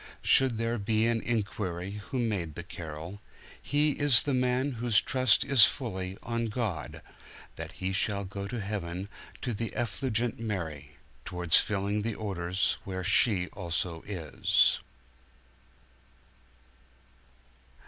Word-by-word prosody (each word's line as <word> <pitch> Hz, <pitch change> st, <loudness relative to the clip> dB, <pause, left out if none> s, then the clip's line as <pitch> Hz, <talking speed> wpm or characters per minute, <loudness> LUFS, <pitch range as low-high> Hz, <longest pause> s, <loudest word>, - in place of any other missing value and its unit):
Should 130 Hz, -4 st, +4 dB
there 115 Hz, +1 st, -1 dB
be 110 Hz, +2 st, +1 dB
an 115 Hz, -1 st, +1 dB
inquiry 100 Hz, -4 st, -3 dB
who 135 Hz, -, -2 dB
made 100 Hz, -10 st, -1 dB
the 85 Hz, -, -5 dB
carol, 85 Hz, +3 st, -8 dB, 0.4 s
He 145 Hz, +2 st, +2 dB
is 145 Hz, -2 st, +4 dB
a 140 Hz, -, +2 dB
man 125 Hz, +2 st, +1 dB
whose 120 Hz, -3 st, +2 dB
trust 130 Hz, -4 st, +3 dB
is 135 Hz, -6 st, +8 dB
fully 95 Hz, -7 st, -3 dB
on 115 Hz, 0 st, -1 dB
God, 105 Hz, -9 st, -3 dB, 0.5 s
That -, -, -7 dB
he 95 Hz, +1 st, -3 dB
shall 100 Hz, 0 st, 0 dB
go 100 Hz, +1 st, -5 dB
to 120 Hz, +3 st, -4 dB
heaven 100 Hz, -2 st, -4 dB, 0.3 s
to 125 Hz, -, -1 dB
the 115 Hz, +2 st, -3 dB
effulgent 120 Hz, +1 st, -1 dB
Mary, 80 Hz, -10 st, -4 dB, 0.3 s
Towards 90 Hz, -2 st, +2 dB
filling 100 Hz, +1 st, 0 dB
the 110 Hz, 0 st, -2 dB
orders 95 Hz, -3 st, -1 dB
where 95 Hz, -1 st, -4 dB
she 95 Hz, -1 st, +3 dB
also 85 Hz, -2 st, -3 dB
is. 85 Hz, -8 st, +2 dB
105 Hz, 125 wpm, -29 LUFS, 90-115 Hz, 0.5 s, is